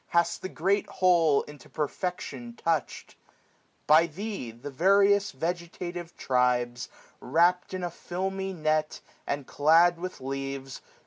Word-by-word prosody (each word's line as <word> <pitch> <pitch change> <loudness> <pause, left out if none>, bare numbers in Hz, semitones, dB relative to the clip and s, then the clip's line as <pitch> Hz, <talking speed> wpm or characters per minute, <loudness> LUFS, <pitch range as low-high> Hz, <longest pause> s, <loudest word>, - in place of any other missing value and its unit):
Hast 170 0 +1
the 185 - -5
great 195 +5 0
whole 170 -6 +3
into 145 -3 -13
perfection 145 -7 -4
touchM. 165 -4 -2 0.7
By 160 +2 +6
Thee 195 - -5
the 120 +6 -9
various 200 +6 +4
vegetative 175 +2 -5
tribes. 125 -1 0 0.3
Wrapt 175 +6 +2
in 185 - -4
a 175 - -2
filmy 190 +3 -4
net, 155 -3 -1 0.3
and 140 -1 -2
clad 165 +5 +4
with 185 +1 -6
leaves. 135 0 -5
165 Hz, 120 wpm, -28 LUFS, 135-180 Hz, 0.7 s, By